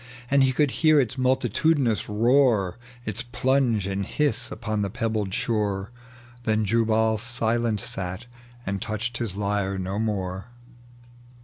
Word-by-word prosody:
And 140 Hz, -1 st, +5 dB
he 130 Hz, -, +3 dB
could 145 Hz, +1 st, +2 dB
hear 155 Hz, -2 st, +6 dB
its 130 Hz, -1 st, 0 dB
multitudinous 130 Hz, -1 st, +1 dB
roar, 115 Hz, -3 st, +3 dB, 0.3 s
Its 110 Hz, +2 st, -1 dB
plunge 120 Hz, -3 st, +1 dB
and 100 Hz, 0 st, -2 dB
hiss 145 Hz, +2 st, 0 dB
upon 110 Hz, -2 st, -2 dB
the 100 Hz, -, -1 dB
pebbled 110 Hz, -1 st, -2 dB
shore: 105 Hz, -1 st, -1 dB, 0.5 s
Then 110 Hz, -1 st, +1 dB
Jubal 110 Hz, 0 st, +2 dB
silent 115 Hz, -1 st, 0 dB
sat, 95 Hz, +4 st, -4 dB, 0.4 s
and 95 Hz, 0 st, -2 dB
touched 110 Hz, +3 st, -3 dB
his 110 Hz, -5 st, -3 dB
lyre 100 Hz, -1 st, -1 dB
no 95 Hz, +2 st, -3 dB
more. 95 Hz, -3 st, -2 dB
110 Hz, 130 wpm, -25 LUFS, 100-120 Hz, 0.5 s, hear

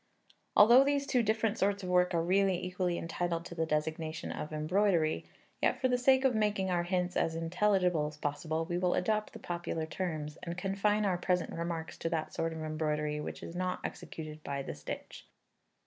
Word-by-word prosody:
Although 235 Hz, +6 st, +8 dB
these 280 Hz, 0 st, +1 dB
two 250 Hz, -3 st, +2 dB
different 220 Hz, 0 st, +1 dB
sorts 200 Hz, +1 st, +1 dB
of 180 Hz, -, -4 dB
work 180 Hz, 0 st, +3 dB
are 165 Hz, -, +2 dB
really 190 Hz, +1 st, +2 dB
equally 180 Hz, -1 st, -1 dB
entitled 170 Hz, 0 st, -2 dB
to -, -, -7 dB
the 165 Hz, -1 st, -1 dB
designation 155 Hz, +1 st, -2 dB
of 150 Hz, -, -5 dB
embroidery, 160 Hz, +1 st, +1 dB, 0.3 s
yet -, -, +2 dB
for 260 Hz, -, +2 dB
the 250 Hz, -, +3 dB
sake 265 Hz, +1 st, +4 dB
of 260 Hz, -, +4 dB
making 210 Hz, -3 st, +1 dB
our 175 Hz, -1 st, +2 dB
hints 180 Hz, 0 st, -1 dB
as 160 Hz, -, +1 dB
intelligible 180 Hz, -1 st, +2 dB
as 150 Hz, 0 st, -9 dB
possible, 155 Hz, +2 st, -2 dB
we 175 Hz, +1 st, -2 dB
will 180 Hz, -1 st, +2 dB
adopt 215 Hz, +3 st, 0 dB
the -, -, -9 dB
popular 170 Hz, -2 st, -3 dB
terms, 155 Hz, -3 st, -4 dB
and 170 Hz, +1 st, -5 dB
confine 200 Hz, +3 st, +1 dB
our 180 Hz, -3 st, +1 dB
present 180 Hz, 0 st, 0 dB
remarks 165 Hz, -1 st, -4 dB
to 165 Hz, -, -1 dB
that 160 Hz, -2 st, -2 dB
sort 165 Hz, 0 st, -1 dB
of 160 Hz, -1 st, -5 dB
embroidery 150 Hz, -1 st, -1 dB
which -, -, -6 dB
is 165 Hz, -, -7 dB
not 185 Hz, 0 st, -1 dB
executed 155 Hz, -1 st, -7 dB
by 140 Hz, -1 st, -3 dB
the -, -, -5 dB
stitch. 75 Hz, 0 st, -8 dB
175 Hz, 195 wpm, -32 LUFS, 160-195 Hz, 0.3 s, Although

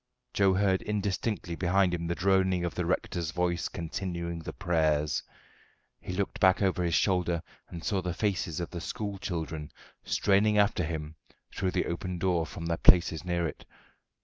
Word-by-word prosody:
Joe 95 Hz, -2 st, +4 dB
heard 95 Hz, -1 st, +2 dB
indistinctly 105 Hz, -2 st, -2 dB
behind 90 Hz, +1 st, +2 dB
him 85 Hz, -1 st, -2 dB
the 85 Hz, -, -1 dB
droning 95 Hz, -1 st, +2 dB
of 85 Hz, -, -3 dB
the -, -, -2 dB
rector's 85 Hz, -3 st, -1 dB
voice 85 Hz, 0 st, 0 dB
continuing 85 Hz, 0 st, -4 dB
the 80 Hz, -, -6 dB
prayers. 75 Hz, -3 st, +1 dB, 0.8 s
He -, -, -7 dB
looked 95 Hz, +2 st, -2 dB
back 95 Hz, 0 st, +5 dB
over 90 Hz, -2 st, +1 dB
his 85 Hz, -2 st, +1 dB
shoulder 90 Hz, -3 st, +1 dB, 0.3 s
and 85 Hz, -2 st, -8 dB
saw 100 Hz, -3 st, 0 dB
the 90 Hz, -1 st, -3 dB
faces 90 Hz, -6 st, -1 dB
of 85 Hz, -, -4 dB
the 85 Hz, -, -5 dB
school 100 Hz, +1 st, -4 dB
children 80 Hz, -5 st, -4 dB, 0.3 s
straining 105 Hz, +2 st, +3 dB
after 100 Hz, -3 st, +3 dB
him 80 Hz, -1 st, -4 dB, 0.4 s
through 95 Hz, -, 0 dB
the 90 Hz, -, +1 dB
open 90 Hz, +1 st, -3 dB
door 85 Hz, -2 st, +1 dB
from 85 Hz, -, -7 dB
their 85 Hz, 0 st, 0 dB
places 85 Hz, -3 st, +5 dB
near 85 Hz, -2 st, 0 dB
it. 75 Hz, -, -8 dB
90 Hz, 170 wpm, -29 LUFS, 85-95 Hz, 0.8 s, back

